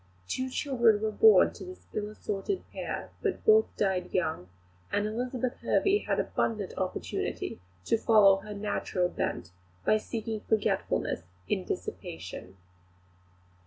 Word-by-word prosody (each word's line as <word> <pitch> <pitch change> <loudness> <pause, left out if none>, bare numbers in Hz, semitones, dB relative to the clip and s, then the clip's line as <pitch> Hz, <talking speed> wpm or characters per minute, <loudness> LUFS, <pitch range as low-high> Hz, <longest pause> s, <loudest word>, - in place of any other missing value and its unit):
Two 255 - -2
children 240 -6 +3
were 220 - +1
born 440 - +6
to - - -9
this 370 0 -10
ill 210 0 -2
assorted 215 - -3
pair, - - -5
but - - -2
both 440 0 +6
died 185 -3 0
young; 155 - -1 0.4
and 205 - +1
Elizabeth 245 +3 -2
Hervey 400 +1 +3
had - - -1
abundant 210 -4 -1
opportunity 185 - -3 0.3
to 225 - +2
follow 210 -4 +6
her 210 +1 -8
natural 200 -3 -1
bent, 90 - -3 0.3
by 215 - +5
seeking 220 0 -4
forgetfulness 220 -2 +1 0.3
in - - -1
dissipation. 90 +3 -6
215 Hz, 125 wpm, -29 LUFS, 195-245 Hz, 0.4 s, born